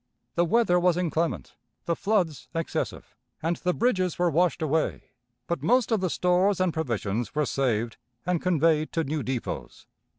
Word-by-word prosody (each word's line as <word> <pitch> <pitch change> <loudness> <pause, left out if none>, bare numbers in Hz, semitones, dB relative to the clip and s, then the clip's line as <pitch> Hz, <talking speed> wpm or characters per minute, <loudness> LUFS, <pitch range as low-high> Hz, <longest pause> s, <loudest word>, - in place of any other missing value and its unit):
The 175 - +2
weather 190 -2 +3
was 175 -1 +3
inclement, 165 - -1 0.3
the 170 - 0
floods 160 - 0
excessive, 165 0 -3 0.3
and 170 +1 0
the 180 - 0
bridges 185 -5 +1
were 175 -1 +2
washed 175 +1 +2
away, 155 +1 -1 0.3
but 170 - -2
most 245 -2 +2
of 220 -4 +2
the 185 - +1
stores 180 +3 +2
and 185 -3 +1
provisions 115 -7 -2
were 150 0 +2
saved 120 -5 0 0.3
and 180 -1 0
conveyed 160 -3 +2
to 165 - +1
new 155 +1 -2
depots. 130 -2 -5
170 Hz, 160 wpm, -27 LUFS, 150-180 Hz, 0.3 s, weather